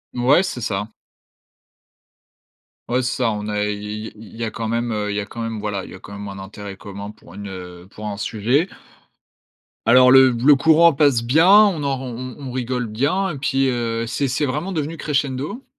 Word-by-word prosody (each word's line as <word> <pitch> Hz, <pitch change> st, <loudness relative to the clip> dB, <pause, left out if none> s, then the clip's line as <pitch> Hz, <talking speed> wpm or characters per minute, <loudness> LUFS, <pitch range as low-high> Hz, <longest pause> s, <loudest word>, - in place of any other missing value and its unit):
Mouais, 130 Hz, +9 st, +4 dB
c'est 125 Hz, -10 st, -4 dB
ça. 105 Hz, -2 st, -2 dB, 2.0 s
Ouais, 125 Hz, +1 st, +1 dB
c'est 130 Hz, -, -2 dB
ça, 115 Hz, -, +2 dB
on 105 Hz, 0 st, -4 dB
a 105 Hz, 0 st, -1 dB
i 105 Hz, +1 st, -4 dB
i -, -, -9 dB
il 110 Hz, 0 st, -13 dB
y 115 Hz, -, -5 dB
a 110 Hz, -, -2 dB
quand 115 Hz, -3 st, -4 dB
même 120 Hz, +1 st, -1 dB
heu, 105 Hz, -1 st, -2 dB
il 100 Hz, -, -2 dB
y 105 Hz, -, 0 dB
a -, -, -6 dB
quand 115 Hz, +2 st, -8 dB
même, 115 Hz, -1 st, -3 dB
voilà 100 Hz, -3 st, -3 dB
il -, -, -12 dB
y -, -, -9 dB
a -, -, -12 dB
quand 100 Hz, -, -13 dB
même 100 Hz, 0 st, -7 dB
un 100 Hz, 0 st, -7 dB
intérêt 100 Hz, 0 st, -8 dB
commun 100 Hz, +1 st, -8 dB
pour 85 Hz, -, -17 dB
une 100 Hz, 0 st, -8 dB
heu, 90 Hz, -1 st, -9 dB
pour 105 Hz, +1 st, -8 dB
un 100 Hz, -1 st, -4 dB
sujet. 120 Hz, -, 0 dB, 1.2 s
Alors 125 Hz, +1 st, +7 dB
le 130 Hz, 0 st, +8 dB
le 130 Hz, +5 st, +5 dB
courant 160 Hz, +3 st, +5 dB
passe 135 Hz, -5 st, +3 dB
bien, 160 Hz, +10 st, +4 dB
on 200 Hz, -7 st, +6 dB
en 135 Hz, -1 st, 0 dB
r -, -, -8 dB
on 120 Hz, -2 st, -6 dB, 0.2 s
on 140 Hz, -2 st, -8 dB
on -, -, -5 dB
rigole 125 Hz, -1 st, -2 dB
bien. 145 Hz, -, 0 dB
Et 145 Hz, -, -6 dB
puis, 135 Hz, 0 st, +1 dB
heu, 115 Hz, -1 st, -2 dB
c'est 135 Hz, +4 st, -1 dB
c'est 145 Hz, +4 st, 0 dB
vraiment 150 Hz, +8 st, -3 dB
devenu 160 Hz, -1 st, -3 dB
crescendo. 145 Hz, -, -2 dB
120 Hz, 220 wpm, -21 LUFS, 105-140 Hz, 2.0 s, le